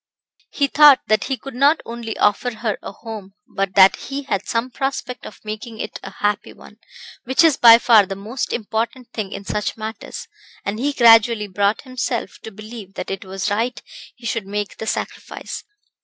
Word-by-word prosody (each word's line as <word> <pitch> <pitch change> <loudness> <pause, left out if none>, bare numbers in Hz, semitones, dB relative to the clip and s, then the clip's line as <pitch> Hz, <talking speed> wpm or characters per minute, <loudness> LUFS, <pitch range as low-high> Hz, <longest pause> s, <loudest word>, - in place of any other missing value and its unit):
He 285 - +1
thought 290 -1 +7
that 215 -1 +2
he 265 - -2
could 275 +1 -9
not 280 +5 +4
only 230 -1 -6
offer 225 +3 +1
her 220 -2 -2
a - - -7
home, 205 -2 -9 0.2
but 195 -1 -1
that 190 0 +7
he 280 +1 -6
had 200 -8 -2
some 235 +2 -1
prospect 270 -2 -4
of - - -12
making 215 +1 -7
it - - -5
a - - -8
happy 205 0 -2
one, 210 - -16 0.5
which 260 +6 +3
is 320 -4 +5
by 230 -3 +9
far 225 -4 +5
the 195 - -4
most 220 +6 -4
important 230 +2 -3
thing 205 -3 -4
in 200 - -7
such 210 +3 -2
matters, 220 0 -7 0.4
and 205 +2 -3
he 285 +4 0
gradually 230 -3 +5
brought 200 +2 0
himself 255 -2 -4
to - - -8
believe 215 -1 -10
that - - -5
it 195 - -4
was 195 +1 -3
right 230 +4 -1 0.4
he 245 - -15
should 225 -3 -2
make 205 0 -4
the 220 - -6
sacrifice. - - -5
225 Hz, 185 wpm, -20 LUFS, 205-250 Hz, 0.5 s, by